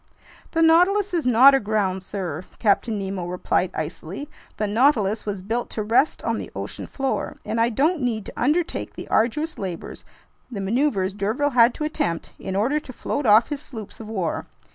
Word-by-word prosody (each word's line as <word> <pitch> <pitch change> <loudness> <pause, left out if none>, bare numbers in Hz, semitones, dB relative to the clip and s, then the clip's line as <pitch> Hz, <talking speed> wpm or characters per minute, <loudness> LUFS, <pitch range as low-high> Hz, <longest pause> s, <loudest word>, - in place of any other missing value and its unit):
"The 330 -1 +3
Nautilus 365 +5 +4
is 330 -7 0
not 250 +3 +8
aground, 205 -6 +1
sir," 180 -4 -5
Captain 215 +1 +2
Nemo 190 -3 -4
replied 180 0 0
icily. 165 - -5 0.3
"The 210 - 0
Nautilus 220 -2 +2
was 200 -2 -3
built 230 +4 -2
to 215 - -3
rest 235 +8 +2
on - - -1
the - - -6
ocean - - -6
floor, 270 -1 -2
and 230 +1 0
I 230 - +3
don't 300 +8 +1
need 225 -4 -1
to - - -8
undertake 315 +7 0
the - - -7
arduous 300 +9 +1
labors, 185 -4 -6 0.5
the 225 -6 -5
maneuvers 200 -2 +1
d'Urville 220 +9 0
had 240 -1 +5
to - - -4
attempt 170 - -2
in 190 - -4
order 250 +10 +2
to 285 - -11
float 265 +2 -3
off 215 +2 +6
his 290 -2 -4
sloops 220 -9 -9
of 220 -1 -8
war. 190 -7 -2
225 Hz, 180 wpm, -23 LUFS, 195-280 Hz, 0.5 s, not